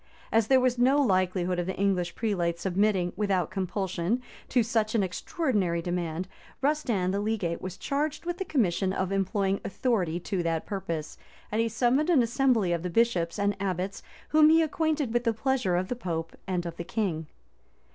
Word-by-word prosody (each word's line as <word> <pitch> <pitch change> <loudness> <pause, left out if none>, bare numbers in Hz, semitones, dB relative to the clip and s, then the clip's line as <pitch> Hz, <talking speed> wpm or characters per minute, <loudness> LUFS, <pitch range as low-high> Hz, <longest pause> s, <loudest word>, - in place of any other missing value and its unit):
[] - - -25
As 225 -1 +3
there 265 +1 +5
was 250 -1 +1
no 265 +4 +4
likelihood 185 -6 +1
of 175 - -2
the 190 - -2
English 185 -3 0
prelates' 175 -6 -1
submitting, 190 -1 +1
without 190 -4 0
compulsion, 190 +2 -1 0.3
to 245 - +3
such 220 -1 0
an 215 - +3
extraordinary 190 - -1
demand, 175 0 -3 0.4
Rustand 245 -11 +1
the 200 - 0
legate 205 -6 -1
was 185 0 -6
charged 300 +3 -2
with 350 +1 -3
the - - 0
commission 195 - +1
of 190 0 -1
employing 195 0 0
authority 190 -8 0
to 190 0 -2
that 165 -1 -1
purpose, 170 -6 -4 0.3
and 215 +2 +1
he 230 - +1
summoned 250 +7 +2
an 295 -8 +5
assembly 235 -5 +2
of 170 - -1
the 180 - -3
bishops 175 -4 +1
and 200 0 +1
abbots 190 0 -2 0.3
whom 305 0 +6
he 325 +1 +6
acquainted 310 -5 0
with 240 0 +1
the 230 -2 +2
pleasure 245 -7 +1
of 185 +1 0
the 250 - -2
pope 165 -7 -4
and 180 -2 -1
of 170 -1 -6
the - - -4
king. 175 -4 -2
195 Hz, 185 wpm, -28 LUFS, 180-240 Hz, 0.4 s, whom